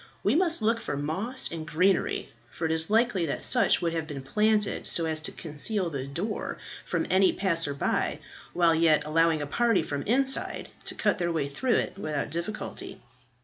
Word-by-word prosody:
We 205 Hz, -, +3 dB
must 330 Hz, -5 st, +2 dB
look 225 Hz, +2 st, +2 dB
for 145 Hz, -, -4 dB
moss 190 Hz, -, 0 dB
and 165 Hz, -1 st, -5 dB
greenery, 185 Hz, +6 st, +1 dB, 0.2 s
for 160 Hz, +5 st, -5 dB
it 160 Hz, -, 0 dB
is 160 Hz, 0 st, +1 dB
likely 215 Hz, -6 st, +2 dB
that 140 Hz, -, -2 dB
such 240 Hz, -7 st, +3 dB
would 165 Hz, -1 st, 0 dB
have 165 Hz, -1 st, -2 dB
been 140 Hz, -3 st, -6 dB
planted, 210 Hz, +5 st, +1 dB
so 165 Hz, -, 0 dB
as 160 Hz, -1 st, -2 dB
to -, -, -4 dB
conceal 170 Hz, +4 st, -2 dB
the 135 Hz, -2 st, -4 dB
door 180 Hz, +10 st, -4 dB, 0.3 s
from -, -, -1 dB
any 190 Hz, 0 st, +5 dB
passer 165 Hz, -7 st, 0 dB
by, -, -, 0 dB, 0.3 s
while 170 Hz, -1 st, +4 dB
yet 160 Hz, -2 st, +3 dB
allowing 160 Hz, 0 st, +2 dB
a -, -, -3 dB
party 230 Hz, +7 st, +2 dB
from 145 Hz, -1 st, -3 dB
inside 265 Hz, +4 st, +1 dB, 0.2 s
to -, -, -1 dB
cut -, -, +1 dB
their 175 Hz, -1 st, 0 dB
way 155 Hz, -4 st, -1 dB
through 235 Hz, -, -1 dB
it -, -, -1 dB
without 150 Hz, -6 st, -3 dB
difficulty." 170 Hz, +6 st, -5 dB
170 Hz, 190 wpm, -27 LUFS, 155-215 Hz, 0.3 s, any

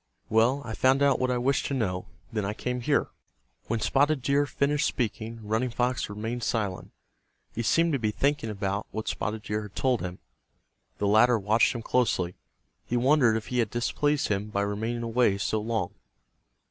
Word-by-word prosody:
Well, 120 Hz, +6 st, +3 dB
I 110 Hz, -, -5 dB
found 130 Hz, +4 st, +3 dB
out 140 Hz, -1 st, +3 dB
what 130 Hz, -, +1 dB
I 125 Hz, -, +1 dB
wished 135 Hz, +3 st, +1 dB
to 140 Hz, -, -2 dB
know. 90 Hz, -7 st, -2 dB, 0.3 s
Then 105 Hz, -2 st, -1 dB
I 105 Hz, +2 st, -2 dB
came 125 Hz, +1 st, -3 dB
here." -, -, +1 dB, 0.6 s
When 115 Hz, 0 st, -1 dB
Spotted 140 Hz, +3 st, +2 dB
Deer 140 Hz, +1 st, +2 dB
finished 145 Hz, +2 st, +1 dB
speaking 115 Hz, -1 st, -3 dB
Running 110 Hz, +4 st, 0 dB
Fox 125 Hz, 0 st, -1 dB
remained 110 Hz, +4 st, -4 dB
silent. 105 Hz, -6 st, -2 dB, 0.6 s
He 115 Hz, -, -2 dB
seemed 165 Hz, +8 st, +2 dB
to 140 Hz, -, +1 dB
be 110 Hz, -2 st, 0 dB
thinking 140 Hz, +2 st, 0 dB
about 100 Hz, 0 st, -2 dB
what 110 Hz, 0 st, -5 dB
Spotted 105 Hz, 0 st, -3 dB
Deer 105 Hz, +1 st, -2 dB
had 105 Hz, -1 st, -10 dB
told 130 Hz, -3 st, +1 dB
him. 90 Hz, 0 st, -5 dB, 0.8 s
The 105 Hz, -, -1 dB
latter 110 Hz, +4 st, +5 dB
watched 110 Hz, +4 st, +2 dB
him 115 Hz, -, -5 dB
closely. 100 Hz, -9 st, +1 dB, 0.5 s
He 120 Hz, -, -1 dB
wondered 125 Hz, -3 st, +4 dB
if 110 Hz, -, -7 dB
he 125 Hz, -, 0 dB
had 115 Hz, -3 st, +1 dB
displeased 145 Hz, +5 st, 0 dB
him 105 Hz, +1 st, -1 dB
by 100 Hz, -1 st, -1 dB
remaining 110 Hz, +4 st, -2 dB
away 115 Hz, -3 st, +2 dB
so 105 Hz, +2 st, -1 dB
long. 110 Hz, +1 st, -2 dB
115 Hz, 185 wpm, -27 LUFS, 105-130 Hz, 0.8 s, latter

